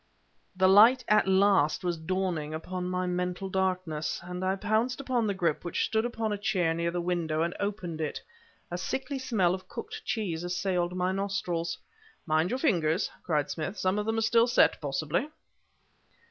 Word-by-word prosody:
The 185 Hz, 0 st, +4 dB
light 230 Hz, +6 st, +7 dB
at 210 Hz, -2 st, +4 dB
last 190 Hz, -6 st, +3 dB
was 175 Hz, -1 st, 0 dB
dawning 165 Hz, -2 st, -2 dB
upon 180 Hz, +3 st, -4 dB
my 180 Hz, 0 st, -1 dB
mental 180 Hz, +1 st, -2 dB
darkness, 185 Hz, -5 st, -1 dB
and 180 Hz, +1 st, -5 dB
I 190 Hz, +1 st, +1 dB
pounced 220 Hz, +6 st, 0 dB
upon 255 Hz, -5 st, 0 dB
the 200 Hz, -, -1 dB
grip, 170 Hz, -5 st, 0 dB
which 175 Hz, -, -1 dB
stood 220 Hz, +1 st, 0 dB
upon 225 Hz, -3 st, -2 dB
a 205 Hz, -, -4 dB
chair 185 Hz, -6 st, +1 dB
near 170 Hz, +1 st, -1 dB
the 175 Hz, +1 st, -2 dB
window, 170 Hz, -3 st, 0 dB
and 170 Hz, +1 st, -2 dB
opened 180 Hz, -5 st, -3 dB
it. 155 Hz, -, -2 dB, 0.5 s
A 175 Hz, -, -3 dB
sickly 270 Hz, +7 st, -3 dB
smell 210 Hz, -9 st, +1 dB
of 185 Hz, 0 st, -6 dB
cooked 440 Hz, -, -7 dB
cheese 175 Hz, -7 st, -2 dB
assailed 180 Hz, 0 st, -1 dB
my 180 Hz, 0 st, 0 dB
nostrils. 190 Hz, -4 st, -2 dB, 0.5 s
"Mind 155 Hz, +2 st, +2 dB
your 255 Hz, -, -1 dB
fingers!" 175 Hz, -, +1 dB
cried 150 Hz, -4 st, 0 dB
Smith; 175 Hz, +6 st, -4 dB
"some 185 Hz, +3 st, +1 dB
of 210 Hz, -, -3 dB
them 225 Hz, 0 st, 0 dB
are -, -, +1 dB
still 230 Hz, +1 st, +4 dB
set, 240 Hz, -, +3 dB
possibly." 155 Hz, -, -1 dB
185 Hz, 175 wpm, -29 LUFS, 170-210 Hz, 0.5 s, light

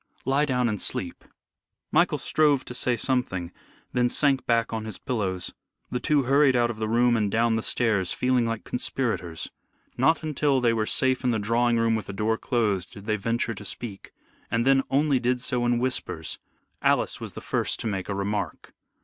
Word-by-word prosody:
Lie 135 Hz, +3 st, +2 dB
down 125 Hz, -3 st, +1 dB
and 105 Hz, -3 st, -2 dB
sleep." -, -, -1 dB, 0.7 s
Michael -, -, +3 dB
strove 145 Hz, -4 st, +2 dB
to -, -, -7 dB
say 125 Hz, -1 st, +1 dB
something, 110 Hz, -9 st, -1 dB, 0.4 s
then 125 Hz, 0 st, +2 dB
sank 135 Hz, 0 st, +2 dB
back 115 Hz, -1 st, +1 dB
on 110 Hz, -1 st, -3 dB
his 110 Hz, -4 st, -6 dB
pillows. 95 Hz, -8 st, -3 dB, 0.4 s
The 125 Hz, -, -1 dB
two 145 Hz, +1 st, +2 dB
hurried 135 Hz, +1 st, +4 dB
out 120 Hz, -1 st, +2 dB
of 110 Hz, -, -8 dB
the 110 Hz, 0 st, -2 dB
room 120 Hz, +1 st, +3 dB
and 105 Hz, -3 st, +1 dB
down 115 Hz, +2 st, +2 dB
the 110 Hz, -, 0 dB
stairs 105 Hz, -7 st, +1 dB
feeling 125 Hz, -2 st, +1 dB
like 115 Hz, -1 st, -3 dB
conspirators. 115 Hz, -10 st, -3 dB, 0.5 s
Not 160 Hz, +6 st, +3 dB
until 150 Hz, -3 st, +1 dB
they 120 Hz, -2 st, +2 dB
were 110 Hz, -1 st, 0 dB
safe 130 Hz, 0 st, +1 dB
in 125 Hz, -, +2 dB
the 115 Hz, -, +1 dB
drawing 115 Hz, +3 st, +1 dB
room 115 Hz, 0 st, +2 dB
with 110 Hz, -, -4 dB
the 100 Hz, -, -6 dB
door 110 Hz, +2 st, 0 dB
closed 105 Hz, -7 st, -1 dB
did 100 Hz, -3 st, -11 dB
they 110 Hz, -1 st, +1 dB
venture 115 Hz, +2 st, -1 dB
to 100 Hz, -, -9 dB
speak, 100 Hz, 0 st, -4 dB, 0.4 s
and 115 Hz, +1 st, 0 dB
then 135 Hz, 0 st, +5 dB
only 140 Hz, -1 st, +2 dB
did 125 Hz, +1 st, 0 dB
so 125 Hz, -1 st, 0 dB
in 120 Hz, 0 st, +2 dB
whispers. 120 Hz, -10 st, -2 dB, 0.4 s
Alice -, -, +1 dB
was -, -, -5 dB
the -, -, -7 dB
first -, -, -1 dB
to -, -, -6 dB
make 100 Hz, -3 st, -3 dB
a 100 Hz, -, -1 dB
remark. 100 Hz, +1 st, -3 dB
120 Hz, 195 wpm, -26 LUFS, 110-130 Hz, 0.7 s, then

